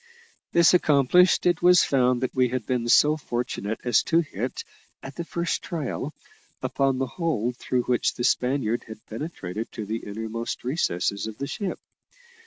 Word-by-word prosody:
This 170 0 +5
accomplished, 170 +2 +4
it 175 -2 +2
was 180 0 +6
found 125 -2 +2
that 130 - -2
we 130 -1 +3
had 125 -2 -3
been 120 -2 -1
so 150 +5 +5
fortunate 120 -6 -3
as 120 -3 +3
to 165 0 +3
hit, 125 - -5 0.4
at 135 - -8
the 170 - -4
first 170 0 -2
trial, 150 -2 -4 0.5
upon 135 -1 +1
the 135 - 0
hole 125 - -1
through 125 0 -1
which 125 0 0
the 120 - -4
Spaniard 125 -2 +1
had 110 -1 -11
penetrated 110 - -6
to 110 - -5
the 110 +2 -2
innermost 110 +2 -5
recesses 110 - -1
of 110 -1 -8
the 140 - -3
ship. 190 +7 -4
125 Hz, 165 wpm, -25 LUFS, 115-155 Hz, 0.5 s, was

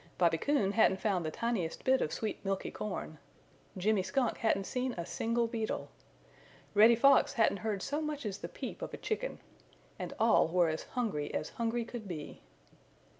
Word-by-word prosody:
Bobby 165 -2 +3
Coon 250 - +2
hadn't 200 -3 +4
found 190 -5 0
the 155 - -1
tiniest 190 -3 -2
bit 260 0 +3
of 150 - 0
sweet 215 -2 -3
milky 195 -1 -2
corn. 185 -7 -5 0.6
Jimmy 205 +2 +2
Skunk 250 +5 0
hadn't 210 -3 +2
seen 250 +4 -2
a 170 -4 -4
single 230 +5 0
beetle. 225 -1 -3 0.8
Reddy 220 +3 +7
Fox 275 +3 +5
hadn't 225 -5 +3
heard 205 -2 -2
so 295 +2 -1
much 300 -4 -4
as 200 -2 -3
the - - -6
peep - - -7
of - - -5
a - - -9
chicken. - - -3 0.6
And - - -4
all - - +5
were 175 0 +3
as 155 - -3
hungry 200 -12 -1
as 155 - -2
hungry 230 0 -1
could 235 -3 -7
be. 155 -5 -7
215 Hz, 175 wpm, -32 LUFS, 185-235 Hz, 0.8 s, Reddy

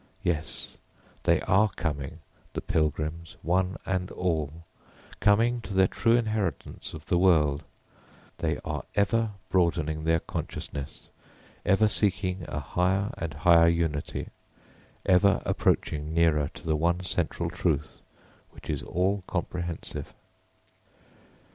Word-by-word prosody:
Yes, 80 -3 -2 0.5
they - - +4
are 105 +3 +4
coming, 75 0 -3 0.3
the - - -3
pilgrims, 80 +1 -1
one 90 +3 +1
and 90 -1 -1
all 80 -2 -2 0.5
coming 115 +4 +3
to 100 - -6
their 95 0 +6
true 115 +4 +2
inheritance 110 - -2
of 80 -1 -10
the 85 - +2
world; 75 -6 +4 0.8
they - - 0
are - - -3
ever 105 +2 +2 0.2
broadening 80 -4 +1
their 80 +1 +3
consciousness, 70 -2 -6 0.6
ever 105 +2 +5
seeking 95 -3 0
a 75 - -3
higher 95 - 0
and 80 -4 -4
higher 85 +2 +6
unity, 85 -3 -1 0.8
ever 95 +2 +5
approaching 75 +1 0
nearer 80 -4 +3
to - - -11
the 80 -1 +2
one 85 +3 +1
central 85 -1 -1
Truth 80 -5 -1 0.5
which - - -7
is - - -2
all 95 +2 0
comprehensive. 85 -2 -4
85 Hz, 115 wpm, -28 LUFS, 80-95 Hz, 0.8 s, their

